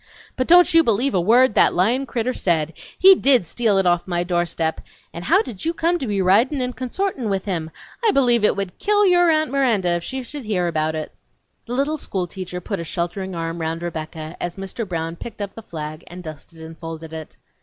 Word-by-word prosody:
"But 255 - -1
don't 355 +1 +6
you 330 0 +7
believe 235 +3 +1
a 185 - +2
word 235 +6 +4
that - - +4
lyin' 235 +10 +1
critter 245 +1 -1
said! 165 -6 0 0.2
He 385 +1 +8
did 265 - +3
steal 215 +3 +1
it 195 - +2
off 175 0 +2
my 175 -1 0
doorstep, 175 -2 -1 0.3
and 170 - -7
how 220 - +4
did 225 -7 -9
you 330 +1 -1
come 345 +2 +1
to 265 - -4
be 200 -2 0
ridin' 230 +10 +3
and 250 -1 -3
consortin' 260 - -2
with 195 -1 -1
him! 170 -5 -3 0.3
I 450 - +4
believe 245 - +3
it - - +4
would 195 -2 -4
kill 415 0 +3
your 350 -2 +5
Aunt 310 -4 +2
Miranda 235 -10 +2
if 175 0 0
she 265 +5 -4
should 280 +1 -7
hear 190 -5 0
about 160 -1 -1
it!" 155 -1 -5 0.5
The 240 - -4
little 285 +4 0
school 190 -8 -3
teacher 180 0 -6
put 195 +2 -4
a - - -3
sheltering 175 +3 -4
arm 165 0 -4
round 165 +1 -3
Rebecca 160 -1 -6
as 175 -1 -3
Mr. 195 +2 -6
Brown 165 -1 -3
picked 225 +3 -9
up 200 -1 -4
the 225 - -9
flag 155 -6 -7
and 180 +1 -10
dusted 160 +1 -10
and 160 0 -9
folded 165 -1 -8
it. 160 -1 -8
195 Hz, 220 wpm, -21 LUFS, 170-255 Hz, 0.5 s, He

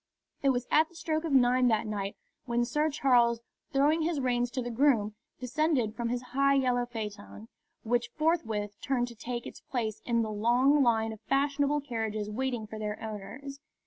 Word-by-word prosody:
It 275 - +3
was 250 -2 +1
at 310 +1 +4
the 345 - -22
stroke 315 0 -2
of 320 - -2
nine 250 -1 +4
that 220 -2 +2
night 205 -2 -3 0.3
when 240 0 +1
Sir 300 +5 +1
Charles, 245 -5 +3 0.3
throwing 295 +3 +3
his 320 -2 0
reins 245 -2 +1
to 255 +1 -3
the 240 - -4
groom, 230 -4 +2 0.3
descended 255 -3 0
from 235 -1 -2
his 245 +1 -2
high 275 +1 +4
yellow 250 -2 +1
phaeton, 215 -1 -7 0.3
which 240 +1 0
forthwith 225 -11 -1
turned 245 -3 0
to 235 - -11
take 240 +1 -5
its - - -9
place 220 -4 -3
in 235 -1 +1
the 215 - -3
long 245 +7 +3
line 225 -3 +2
of 220 - -12
fashionable 285 +1 +2
carriages 220 -5 -3
waiting 245 -1 -2
for 215 0 -8
their 210 0 -3
owners. 225 +7 -7
245 Hz, 180 wpm, -29 LUFS, 220-275 Hz, 0.3 s, at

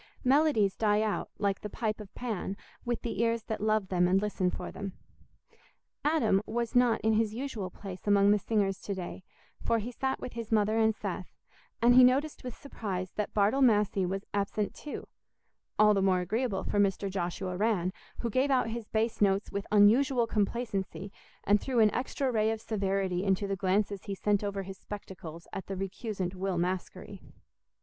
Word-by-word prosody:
Melodies 260 -7 +3
die 210 -1 +2
out, 215 -1 -2
like 200 -2 0
the 210 - -5
pipe 215 0 -2
of 200 - -11
Pan, 210 -5 -3 0.3
with 240 -1 -2
the 230 - -2
ears 230 -1 +1
that 220 -2 -4
love 215 -2 +1
them 180 -1 +3
and 185 +2 +4
listen 200 -3 0
for - - -5
them. 195 -2 -6 1.1
Adam 295 -10 +3
was 235 0 -2
not 245 -2 +4
in 220 0 +2
his 215 0 +1
usual 235 -7 -4
place 190 +1 -9
among 200 0 +5
the 210 - +4
singers 200 -3 0
to 200 - -4
day, 185 0 -6 0.4
for 230 - +2
he 225 +3 -4
sat 265 +2 -2
with - - -6
his 230 -2 -6
mother 215 0 +3
and 220 -1 +3
Seth, - - -4 0.6
and 240 +1 +7
he 255 +1 +9
noticed 275 +5 +2
with 250 -2 -6
surprise 190 -9 -5
that 210 - -4
Bartle 215 +6 +3
Massey 210 -5 +3
was 195 +2 -2
absent 205 +1 -1
too—all 215 -6 -2
the 195 - +2
more 185 -1 +3
agreeable 215 +2 -1
for 205 - -1
Mr. 200 0 +2
Joshua 185 0 -3
Rann, 190 -3 +1 0.3
who 235 - -2
gave 260 +5 +2
out 255 -4 +2
his 230 -1 -5
bass 225 +1 -1
notes 200 0 +2
with 200 0 -4
unusual 235 +5 +5
complacency 205 -3 -2 0.3
and 205 0 +3
threw 260 -2 -2
an 215 -2 +5
extra 260 +1 -1
ray 220 -2 +2
of 225 0 -1
severity 195 -4 -1
into 195 0 +1
the 195 0 -1
glances 195 +1 0
he 200 - -3
sent 205 +1 +1
over 200 -1 -2
his 190 0 -9
spectacles 175 -5 -9
at 190 - -5
the 195 - -4
recusant 195 -1 -4
Will 190 -1 -2
Maskery. 180 +1 -3
210 Hz, 185 wpm, -30 LUFS, 195-230 Hz, 1.1 s, he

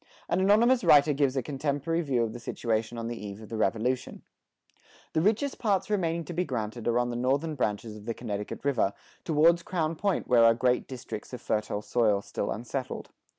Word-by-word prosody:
An - - +1
anonymous 230 +6 +4
writer 150 +1 +6
gives 140 -1 +1
a 130 - 0
contemporary 145 +4 -1
view 130 -7 +1
of 110 -1 -3
the 120 - -7
situation 115 0 -2
on 115 0 -4
the 120 -2 -5
eve 100 0 -7
of 110 - -11
the 115 - -5
Revolution:[72:3] 115 +5 -1 0.9
The 155 - +2
richest 225 - +1
parts 205 -3 0
remaining 170 -5 0
to 175 - -6
be 175 +2 0
granted 120 -5 -4
are 120 0 +2
on 120 0 +1
the - - -4
northern 135 +6 0
branches 110 -4 -2
of 105 - -12
the 115 -1 -3
Connecticut 105 +1 -5
river, 120 -8 +2 0.3
towards 165 +2 +4
Crown 165 -2 -1
Point 200 +3 -1
where 120 -2 +5
are 115 0 +6
great 125 +1 +1
districts 125 -3 -7
of 125 - -5
fertile 105 -1 -1
soil 105 -4 +2
still 100 - -3
unsettled. 120 +3 -4
125 Hz, 195 wpm, -28 LUFS, 115-165 Hz, 0.9 s, writer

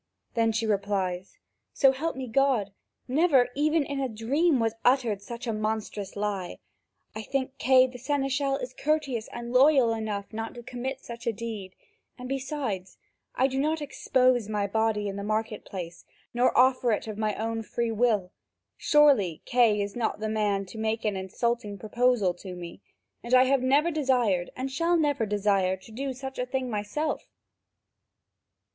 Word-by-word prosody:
Then 225 -1 +2
she 225 +1 -1
replies: 195 -3 -1 0.4
"So 270 -2 +5
help 310 +5 -3
me 260 -1 -4
God, 245 -5 +2 0.4
never 270 -2 +3
even 305 +3 +2
in 280 0 -4
a 265 -1 -1
dream 265 +7 +1
was 225 -1 +1
uttered 245 -6 +2
such 235 +4 -7
a 230 - -1
monstrous 215 -2 -3
lie. 200 -3 -3 0.6
I 220 - -5
think 265 +3 -3
Kay 260 0 +6
the 250 -1 -8
seneschal 275 +1 0
is 255 -2 -6
courteous 280 -7 -1
and 240 0 -6
loyal 260 -3 +5
enough 215 -2 -4
not 225 +2 -5
to 240 - -9
commit 255 +2 -5
such 235 0 -9
a - - +3
deed, 215 -4 -6 0.4
and 250 - -7
besides, 260 -8 -4 0.4
I 260 - +3
do 265 0 0
not 310 +3 +1
expose 255 -5 +1
my 210 -1 0
body 215 0 0
in 195 0 -4
the 200 - -4
market 215 +1 -2
place, 170 -3 -7 0.3
nor 245 +1 +2
offer 255 -1 +4
it - - -2
of 215 -1 -6
my 215 -1 0
own 225 +1 -2
free 230 +1 -2
will. 215 -5 +1 0.5
Surely, 275 - +4
Kay 230 -4 +3
is 200 0 -6
not 235 -3 -1
the 215 0 -2
man 205 -2 0
to 220 +4 -10
make 220 +1 -1
an 210 -2 0
insulting 205 +3 -2
proposal 225 -3 +1
to 180 +1 -9
me, 175 -1 -9 0.4
and 240 +2 +2
I 255 - +7
have 265 0 +2
never 285 +6 +3
desired 245 - +1
and 260 +1 -4
shall 335 +5 +2
never 290 -7 +1
desire 200 -2 +1
to 205 +4 -16
do 270 +4 -3
such 265 +1 -7
a 250 - -1
thing 255 -1 -2
myself." 215 +9 -3
235 Hz, 170 wpm, -27 LUFS, 210-265 Hz, 0.6 s, I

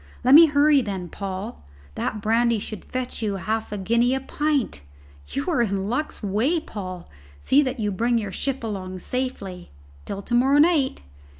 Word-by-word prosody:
"Let 255 +2 +5
me 325 +3 +10
hurry, 290 -1 +4
then, 190 -6 -4
Paul; 195 - -6 0.3
that 210 - -3
brandy 230 +2 +2
should 215 +1 -7
fetch 255 -1 -5
you 210 -3 -1
half 215 +4 -3
a 210 - -3
guinea 235 +6 +2
a - - -1
pint. 285 - -1 0.5
You 140 - -3
are 240 - +2
in 200 -3 -1
luck's 255 +1 -3
way, 225 - +1
Paul. 185 - -7 0.3
See 275 - +4
that 260 -3 -2
you 210 -2 0
bring 235 +5 +1
your 205 -3 -3
ship 270 +4 -3
along 190 -4 -4
safely. 195 -5 -4 0.4
Till 200 0 -5
to 240 - -5
morrow 265 +4 +4
night!" 300 -3 +3
230 Hz, 175 wpm, -24 LUFS, 195-265 Hz, 0.5 s, me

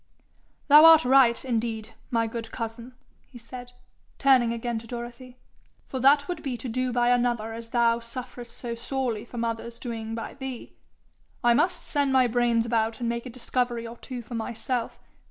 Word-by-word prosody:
'Thou 300 +2 +9
art 325 -2 +8
right, 255 -2 +4
indeed, 225 -3 -2 0.2
my 230 -1 +1
good 225 0 -6
cousin!' 230 +1 -6 0.3
he 250 - -13
said, 245 +1 -10 0.4
turning 260 -4 +4
again 235 0 -3
to 230 - -13
Dorothy; 240 +1 -8 0.5
'for 260 - -4
that 285 +3 +5
would 355 -3 -4
be 270 -5 -3
to 260 - -6
do 255 +2 -1
by 240 0 +2
another 240 -2 +1
as 230 0 -7
thou 235 -1 +2
sufferest 240 0 -8
so 240 -2 -5
sorely 240 -2 -3
from 235 -1 -4
others 230 0 -4
doing 225 -2 -5
by 230 - -6
thee. 265 -3 -7 0.7
I 240 0 +5
must 350 +8 +1
send 285 -2 +1
my 260 -1 +5
brains 235 -1 +2
about 225 -1 0
and 240 - -2
make 235 +2 -3
a - - -6
discovery 245 -1 -2
or 230 +1 -8
two 250 -1 -7
for 230 - -10
myself. 230 +1 -3
240 Hz, 175 wpm, -26 LUFS, 230-255 Hz, 0.7 s, Thou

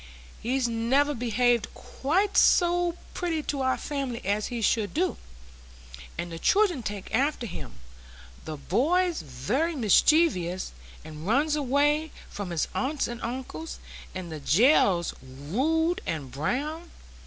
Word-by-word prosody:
"He's 255 +2 0
never 250 +6 +2
behaved 240 -1 +1
quite 375 +9 -1
so 350 -1 +4 0.2
pretty 330 -4 -2
to 280 -2 -2
our 260 0 +1
family 275 -5 -3
as 205 +2 0
he 240 -2 -4
should 220 0 +1
do, 360 +3 0 1.0
and 175 0 -4
the 165 - -6
children 390 - +3
take 205 -3 -6
after 270 +1 +1
him,—the 60 - -11
boy's 325 - +1
very 205 - -1
mischievous, 215 - +3 0.3
and 155 +2 -8
runs 290 +7 +2
away 295 +2 +1 0.2
from 200 -3 -5
his 170 -3 -1
aunts 275 +2 -1
and 240 0 -6
uncles, 260 +7 -5 0.4
and 180 -3 -6
the 155 - -5
gell's 180 - +4
rude 265 - -1
and 145 -5 -3
brown. 290 - -3
245 Hz, 125 wpm, -27 LUFS, -, 1.0 s, so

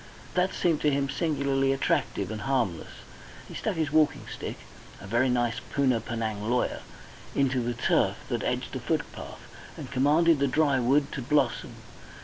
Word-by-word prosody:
That 185 +1 +1
seemed 165 -4 +1
to 150 - +3
him 140 -1 0
singularly 140 -4 +1
attractive 110 -6 0
and 110 -1 -5
harmless. 115 -10 -2 0.4
He - - -10
stuck - - -2
his 160 -3 -1
walking 155 -1 +2
stick - - -6 0.4
a - - -10
very 120 +6 +2
nice 120 -2 +1
Poona 130 -4 +2
Penang 110 -2 -3
lawyer 125 +1 0 0.6
into 130 -2 +2
the 120 0 -2
turf 120 - +2
that - - -1
edged - - -2
the - - -4
footpath, - - -4 0.4
and 130 - -8
commanded 150 +4 +4
the 140 - +2
dry 140 0 +2
wood 140 +4 +2
to 135 - -4
blossom. 135 -1 0
135 Hz, 160 wpm, -27 LUFS, 120-145 Hz, 0.6 s, commanded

